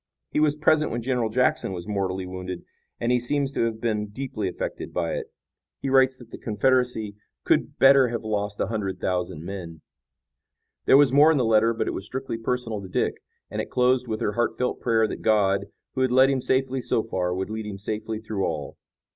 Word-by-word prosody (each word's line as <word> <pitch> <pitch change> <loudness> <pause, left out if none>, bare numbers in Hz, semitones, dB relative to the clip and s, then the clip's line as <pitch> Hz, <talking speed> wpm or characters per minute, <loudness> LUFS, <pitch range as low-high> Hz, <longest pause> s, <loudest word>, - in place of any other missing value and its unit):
He - - +1
was 150 -1 +3
present 155 0 +3
when 120 0 -3
General 125 -3 0
Jackson 125 -4 +1
was 90 +1 -6
mortally 95 -2 -2
wounded, 90 -1 -6 0.4
and 120 - 0
he 125 - +3
seems 140 +3 0
to 115 - 0
have 110 -1 -3
been 110 -2 -1
deeply 110 -2 -4
affected 90 - -5
by 85 -2 0
it. - - -5 0.5
He 135 - -3
writes 130 -1 +4
that 120 -3 -15
the - - -8
Confederacy 110 -2 +1 0.3
could - - +1
better 135 -1 +7
have 115 -1 -4
lost 105 -1 -2
a - - +2
hundred 95 -3 -3
thousand 90 -4 -2
men." 85 -4 -7 1.1
There 135 - +8
was 140 -3 +5
more 150 +3 +7
in 155 - +2
the 125 - +2
letter, 110 0 +4
but 115 - -2
it - - -1
was 95 - -5
strictly 130 -1 -5
personal 115 -3 -2
to 95 - -8
Dick, - - -1 0.3
and - - -2
it - - -7
closed 125 0 +2
with 110 -1 -3
her - - +1
heartfelt 120 +2 -1
prayer 115 -2 +2
that - - -6
God, 100 -2 +2 0.3
who 130 - -2
had 130 -1 +2
led 130 +2 +6
him 135 -2 0
safely 130 0 0
so 115 - 0
far, 90 -5 -2
would 95 +3 -3
lead 110 -1 -4
him 100 -2 -5
safely 110 +2 -4
through 110 -3 -3
all. 75 -5 -3
110 Hz, 210 wpm, -25 LUFS, 100-130 Hz, 1.1 s, There